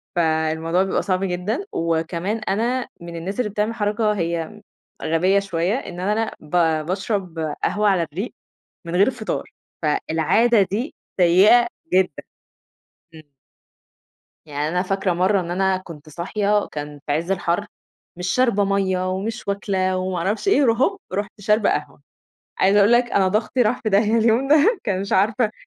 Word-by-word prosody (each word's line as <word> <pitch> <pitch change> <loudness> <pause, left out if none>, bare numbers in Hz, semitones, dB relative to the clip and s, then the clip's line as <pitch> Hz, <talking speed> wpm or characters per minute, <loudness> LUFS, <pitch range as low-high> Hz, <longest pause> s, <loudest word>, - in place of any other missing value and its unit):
فالموضوع 160 +1 +1
بيبقى 195 - 0
صعب 185 0 -1
جدًا 195 - -2
وكمان 170 +5 -1
أنا 230 +5 -1
من 170 0 -8
الناس 185 +7 -5
اللي 220 -4 0
بتعمل 215 +2 -1
حركة 210 0 0
هي 170 +2 -3 0.4
غبية 185 +5 +2
شوية، 180 -1 -1
إن 180 -9 -6
أنا 210 +4 0
ب - - -16 0.4
بأشرب 190 -2 -3 0.2
قهوة 210 0 +2
على 185 -4 +2
الرِّيق 175 +9 -5 0.5
من 170 +1 -4
غير 200 +8 +4
فطار، 230 -3 -4 0.4
فالعادة 165 +9 +2
دي 235 +9 -3 0.3
سيئة 200 +8 +6 0.3
جدًا. 185 -5 +1 0.9
إمم. 155 -2 -15 1.2
يعني 150 0 -2
أنا 180 +3 0
فاكرة 195 0 -1
مرَّة 185 +3 +2
إن 170 -1 -5
أنا 190 +1 +1
كنت 165 -5 -11
صاحية، 200 +6 0
كان 145 -1 -6
في 145 - 0
عِز 165 +5 -1
الحَر، 185 +1 0 0.5
مش 180 +1 -3
شاربة 235 -2 +2
مَيّة 190 -2 0
ومش 205 +4 -4
واكلة 190 -2 0
وما 185 -1 -2
عرفش 210 - -1
إيه، 340 -7 +4
ر 235 - +4
هوب، 305 - 0
رُحت 205 +1 -4
شاربة 210 +2 +2
قهوة. - - -3 0.6
عايزة 195 +2 +4
أقول 205 +3 +5
لك 240 +1 +5
أنا 190 -1 +3
ضغْطي 215 +6 0
راح 235 +1 +1
في 215 - -1
داهية 210 +3 +3
اليوم 230 +4 +2
ده، 315 - +4
كان 195 -3 -1
مش 200 - -3
عارفة 215 +3 +2
195 Hz, 155 wpm, -22 LUFS, 175-215 Hz, 1.2 s, سيئة